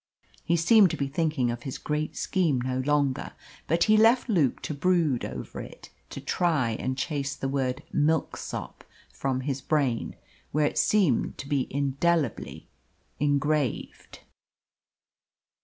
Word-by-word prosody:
He 170 - +1
seemed 200 +3 +6
to - - -3
be 140 - -1
thinking 150 -4 0
of 120 0 -5
his 130 +1 -5
great 150 0 -3
scheme 165 -9 +1
no 130 +1 -2
longer, 140 0 0 0.3
but 165 +3 +3
he 215 0 +4
left 230 +4 +5
Luke 170 - +2
to - - -3
brood 155 -4 +1
over 65 -1 -6
it - - -12 0.2
to - - -7
try 155 -10 0
and 130 +4 -3
chase 140 -2 -2
the 135 - -3
word 135 -2 -1
"Milksop" 155 +1 -1 0.3
from 130 -1 -2
his 135 0 -3
brain, 135 -5 0 0.4
where 150 +1 +2
it - - 0
seemed 190 - +2
to 140 - -7
be 140 -2 0
indelibly 140 +1 -1 0.5
engraved. 145 -2 -1
145 Hz, 140 wpm, -27 LUFS, 130-165 Hz, 0.5 s, seemed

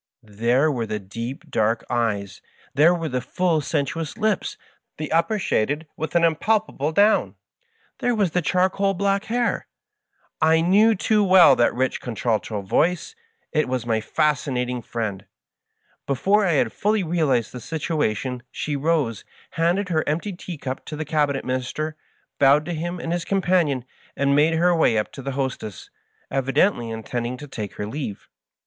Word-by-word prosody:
There 120 +8 +1
were 120 -5 -2
the 105 0 -2
deep, 115 +7 -7
dark 110 +1 0
eyes, 105 -5 -1 0.3
there 150 +5 +5
were 165 -2 -3
the 125 -3 -2
full, 165 +4 0
sensuous 150 +1 -2
lips, 215 -3 0 0.4
the 155 -1 -5
upper 165 +7 +2
shaded 150 - 0
with 160 +2 -5
an 170 - +4
impalpable 165 -2 +1
down, 205 +6 +3 0.6
there 245 -1 +1
was 200 -6 +1
the 180 - +1
charcoal 190 +3 +1
black 200 +2 0
hair! 240 +1 -1 0.7
I 160 +1 +5
knew 205 +7 +4
too 210 +2 +2
well 185 -7 +7
that 120 - +2
rich 130 +1 -1
contralto 110 -3 -2
voice 175 - +1 0.4
1 155 - +3
It - - -4
was 125 -2 -2
my 110 -2 0
Fascinating 125 -3 0
Friend 110 -4 -4
1 - - -28 0.8
Before 195 +10 +2
I 170 - +2
had 125 -6 +1
fully 210 0 +1
realized 155 -9 +1
the 125 - -7
situation 130 -5 -2
she 150 - -3
rose, 140 -7 0 0.3
handed 180 +3 +1
her 155 -2 +1
empty 170 +7 -2
tea 175 -1 -7
cup 130 -2 -5
to 155 - -6
the 155 +1 -4
Cabinet 145 -2 0
Minister, 130 +5 -3 0.4
bowed 145 +2 +5
to 175 - -3
him 175 +2 -4
and 165 0 -3
his 175 -1 -1
companion, 175 -9 +1 0.3
and 140 0 +2
made 155 +3 +4
her 175 +2 +3
way 140 -8 +3
up 105 - -1
to 135 - -9
the 135 +1 -4
hostess, 130 -7 -4 0.4
evidently 135 - +1
intending 120 +2 -4
to 145 - -9
take 110 -7 -6
her 105 - -4
leave. 110 -3 -6
150 Hz, 165 wpm, -23 LUFS, 125-175 Hz, 0.8 s, well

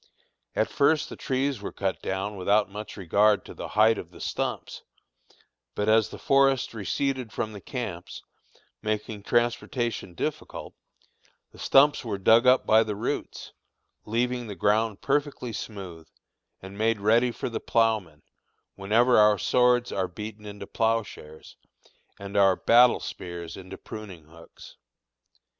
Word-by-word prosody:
At - - +1
first 150 +2 +2
the - - -8
trees 135 -3 -2
were - - -5
cut 95 -1 -3
down 95 +2 -3
without 100 +1 +1
much 105 +2 -8
regard 100 +3 +2
to - - -10
the - - -7
height 110 +1 +3
of - - -9
the - - -15
stumps, - - -4 0.9
but 105 - -1
as 110 -1 +4
the - - -9
forest 135 -3 +2
receded 125 +4 -2
from 110 0 -4
the 100 - -9
camps, 95 -9 -6 0.6
making 105 -1 -3
transportation 120 -3 -1
difficult, - - -5 0.8
the - - -17
stumps 145 +1 +4
were 110 -4 -3
dug 115 +5 +4
up 130 +1 +5
by 110 +1 +5
the 110 -2 -2
roots, 100 - -4 0.5
leaving 120 +2 -1
the 100 - -6
ground 105 +1 +1
perfectly 140 -4 -1
smooth, 95 -7 -8 0.6
and 95 +2 -10
made 110 0 +1
ready 115 +4 +3
for 120 - -5
the 115 - -4
ploughman, 110 -9 0 0.5
whenever 115 +5 +3
our 105 0 +5
swords 125 +3 +2
are 95 -1 -1
beaten 105 +3 -8
into 100 -1 -8
ploughshares 110 -9 -3 0.6
and 100 0 -9
our 95 -2 +5
battle 120 +4 +5
spears 85 -2 -7
into 95 0 -10
pruning 100 -7 -10
hooks. 85 +2 -16
110 Hz, 140 wpm, -26 LUFS, 100-120 Hz, 0.9 s, up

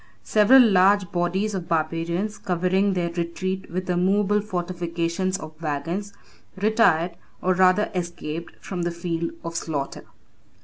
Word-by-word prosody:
Several 235 +5 +6
large 195 -2 +4
bodies 185 +4 0
of 180 -3 -4
barbarians, 170 +5 -1
covering 185 +2 +1
their 175 -2 -1
retreat 185 +2 -3
with 185 +2 -4
a 180 - 0
movable 200 +3 +2
fortification 175 -2 -2
of 155 0 -8
wagons, 165 +7 -3 0.4
retired, 190 -5 +2 0.2
or 185 - +1
rather 185 +3 +3
escaped, 170 -2 -5
from 180 -2 -4
the 175 - 0
field 170 -1 -3
of 165 0 -5
slaughter. 145 -4 -3
180 Hz, 130 wpm, -24 LUFS, 170-195 Hz, 0.4 s, Several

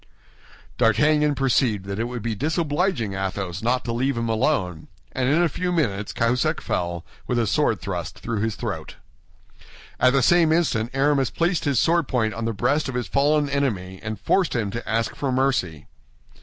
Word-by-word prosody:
D'Artagnan 150 +6 +3
perceived 125 -7 +1
that 100 +1 -4
it 115 - 0
would 120 -2 -5
be 115 -1 -1
disobliging 150 - -1
Athos 95 -1 -3
not 125 +2 0
to 115 - -2
leave 130 +2 0
him 115 0 -1
alone; 110 - 0 0.2
and 130 -1 0
in 160 +5 +3
a - - +4
few 180 +4 -2
minutes 105 - -1
Cahusac 125 +7 +1
fell, 85 -1 -3 0.2
with 125 - 0
a 120 - +2
sword 100 - +1
thrust - - -5
through 115 -3 -3
his 110 0 -1
throat. 95 -10 -5 1.0
At 125 0 +4
the 135 -2 +3
same 170 +2 +4
instant 145 -9 +1
Aramis 135 -1 +2
placed 170 0 0
his 140 -3 +2
sword 170 -3 +2
point 110 -4 0
on 115 0 -4
the 115 - 0
breast 135 +7 0
of 130 - -5
his 125 -1 -1
fallen 145 +1 +2
enemy, 105 -10 -2
and 110 -1 -5
forced 185 -7 +1
him 105 -4 -1
to 115 +3 -6
ask 115 0 0
for 140 -2 -2
mercy. 125 - 0
125 Hz, 185 wpm, -23 LUFS, 110-145 Hz, 1.0 s, a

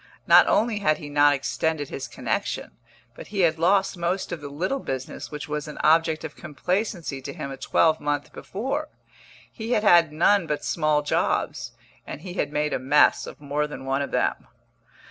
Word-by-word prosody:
Not - - +7
only 220 -1 +2
had 155 -6 +2
he 145 - -8
not 145 0 +4
extended 145 +1 -2
his 135 - -5
connexion, - - -3 0.4
but - - -11
he 200 -1 -2
had 165 -2 +2
lost 195 +3 +2
most 180 +2 -2
of 170 -3 -5
the 145 - -7
little 185 - -2
business 130 - -5
which 150 -1 -6
was 150 0 -4
an 150 - -8
object 160 0 +3
of 160 -2 -7
complacency 175 - -3
to 140 - -6
him 140 - -6
a 135 - -7
twelvemonth 145 0 +1
before. 275 +9 -4 0.6
He 230 +1 -3
had 215 - +1
had 170 -6 +6
none 175 +4 +3
but 150 -1 -3
small 155 -2 +1
jobs, - - -1 0.3
and - - -7
he 180 0 -7
had 145 -6 -2
made 150 0 -1
a - - 0
mess 135 +4 +3
of - - -10
more 150 +1 -2
than 150 -2 -8
one 135 +1 0
of 140 - -3
them. - - -1
155 Hz, 185 wpm, -25 LUFS, 145-185 Hz, 0.6 s, Not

